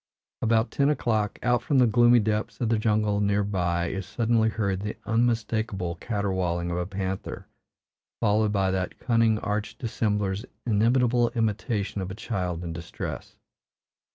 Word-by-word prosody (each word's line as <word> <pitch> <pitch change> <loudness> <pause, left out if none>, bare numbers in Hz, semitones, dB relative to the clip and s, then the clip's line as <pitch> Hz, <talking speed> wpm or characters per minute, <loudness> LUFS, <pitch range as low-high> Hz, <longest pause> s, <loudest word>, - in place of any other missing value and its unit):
About 115 +1 +2
ten 140 0 +2
o'clock, 110 -7 0
out 125 -1 +2
from 140 +3 +1
the 125 - +6
gloomy 120 +2 +5
depths 110 0 -1
of 120 - 0
the 115 -1 +2
jungle 105 -1 +1
near 100 0 +2
by 85 -4 0
is 95 -1 -4
suddenly 115 -1 +2
heard 100 -4 -1
the 105 +2 -5
unmistakable 110 -5 0
caterwauling 90 -3 -2
of 85 - -2
a 90 0 -2
panther, 95 -1 -4 0.7
followed 110 -1 +2
by 95 -2 +1
that 95 -1 -2
cunning 115 -2 +2
arch 105 -1 -3
dissembler's 105 -4 -1 0.2
inimitable 120 +2 +3
imitation 105 -2 -1
of 95 - -4
a 95 - -6
child 90 -6 -3
in 85 -1 -4
distress. 85 +1 -6
105 Hz, 150 wpm, -26 LUFS, 95-115 Hz, 0.7 s, the